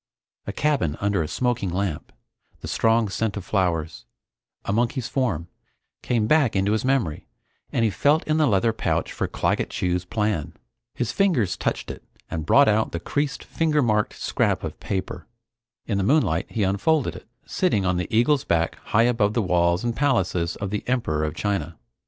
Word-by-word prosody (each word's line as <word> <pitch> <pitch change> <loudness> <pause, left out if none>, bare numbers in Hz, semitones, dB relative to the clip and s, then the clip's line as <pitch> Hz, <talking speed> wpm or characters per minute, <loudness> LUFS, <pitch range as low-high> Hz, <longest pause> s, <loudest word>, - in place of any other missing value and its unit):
A - - -1
cabin 140 - 0
under 100 -3 +1
a 80 - -2
smoking 120 -1 -1
lamp, 90 -3 -3 0.5
the - - -6
strong 115 0 +2
scent 105 +1 -2
of 95 - -6
flowers, 85 - -1 0.6
a 100 - -1
monkey's 120 +2 0
form, 110 - -1 0.5
came 115 -3 0
back 140 -2 +3
into 95 +1 +2
his 110 - 0
memory 130 - 0 0.4
and 115 - +1
he 110 - +1
felt 145 +9 +2
in 155 0 +2
the 155 -2 +3
leather 110 +2 +2
pouch - - -1
for - - -2
Claggett - - -1
Chew's 90 -1 -1
plan. 105 -4 -2 0.4
His 120 -2 -1
fingers 155 - +1
touched - - -2
it - - -11 0.3
and 80 -1 -4
brought 140 0 +6
out 110 +1 +2
the 85 - -2
creased, 145 - -2
finger 155 -3 +1
marked 105 -2 +1
scrap - - 0
of - - -6
paper. 95 -2 -4 0.6
In 100 -3 -1
the - - +1
moonlight 145 +9 +2
he 110 - -1
unfolded 120 +10 +1
it, - - -11 0.2
sitting 135 - 0
on 90 -1 +1
the 90 - -2
eagle's 125 +5 +3
back 85 -1 0
high 115 - +3
above 110 -3 +2
the 115 - +2
walls 85 0 +2
and 120 -1 -1
palaces 95 -11 +1
of 100 -2 -5
the 105 - -2
Emperor 115 -12 0
of 75 +1 -2
China. 85 -5 -2
105 Hz, 180 wpm, -24 LUFS, 90-125 Hz, 0.6 s, brought